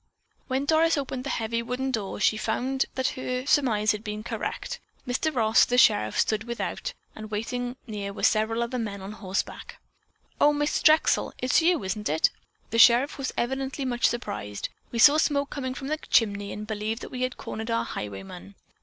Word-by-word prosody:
When 265 +1 -1
Doris 320 +1 +3
opened 265 -2 -3
the - - -3
heavy 230 +1 -1
wooden 250 +3 -2
door, 210 -6 -3
she 215 - +3
found 255 +5 -1
that 260 0 +1
her 255 0 -4
surmise 230 -8 +3
had 210 0 -4
been 210 0 -5
correct. - - -4 0.3
Mr. 255 +6 0
Ross, 225 -3 +4
the 245 - +1
sheriff, 105 - +4
stood 215 0 +1
without, 240 - -4 0.2
and 215 0 -8
waiting 245 +4 -3
near 205 -4 -5
were 200 - -8
several 225 +2 +2
other 245 +2 -3
men 200 -4 -4
on 195 - -6
horseback. 195 -3 -4 0.6
"Oh. 295 0 +5
Miss 295 0 0
Drexel, 310 +1 +4
it's 255 +5 +2
you, 335 - +2
is 190 +2 -1
it?" 160 -7 +1 0.4
The 230 - +1
sheriff 245 +5 +6
was 265 - -2
evidently 265 +2 -2
much 245 -1 +2
surprised. 200 - -4 0.2
"We 235 - -4
saw 290 +6 +7
smoke 285 -2 +1
coming 260 -2 -4
from 270 - -6
the 310 +2 -1
chimney 205 -6 +1
and 210 - -6
believed 215 +2 -3
that - - -8
we 255 - -5
had 255 0 -1
cornered 220 +1 -6
our 230 0 0
highwayman. 95 -2 -7
235 Hz, 185 wpm, -26 LUFS, 215-265 Hz, 0.6 s, saw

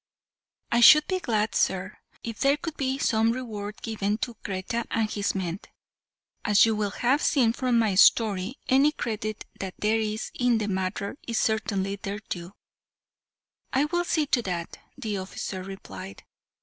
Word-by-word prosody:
"I 235 - +3
should 305 +5 +9
be 375 -1 -1
glad, 215 - 0
sir, 190 +1 0 0.2
if 230 -2 -6
there 280 +1 +3
could 320 +1 -6
be 265 -1 -1
some 225 -4 +2
reward 215 -4 -6
given 210 -2 -1
to 240 - -10
Kreta 195 +4 -3
and 225 -1 +1
his 205 -1 -2
men; 180 -1 -2 0.8
as 210 +1 +5
you 225 -1 +1
will 210 -1 0
have 255 +8 +1
seen 240 -6 +3
from 250 -1 +1
my 220 -3 +2
story, 205 +3 +4
any 275 +3 +4
credit 215 -5 -4
that 190 -2 -5
there 220 +1 +1
is 215 0 -3
in 245 -2 +2
the 215 -1 -2
matter 190 +4 -2
is 230 -2 -1
certainly 200 -3 0
their 200 +1 -5
due." 180 -3 -7 1.2
"I 270 +3 +3
will 345 +3 0
see 315 -3 +1
to 260 -3 +1
that," 175 -5 -4 0.2
the 210 -3 -3
officer 190 0 -5
replied. 100 - -9
215 Hz, 160 wpm, -26 LUFS, 195-245 Hz, 1.2 s, should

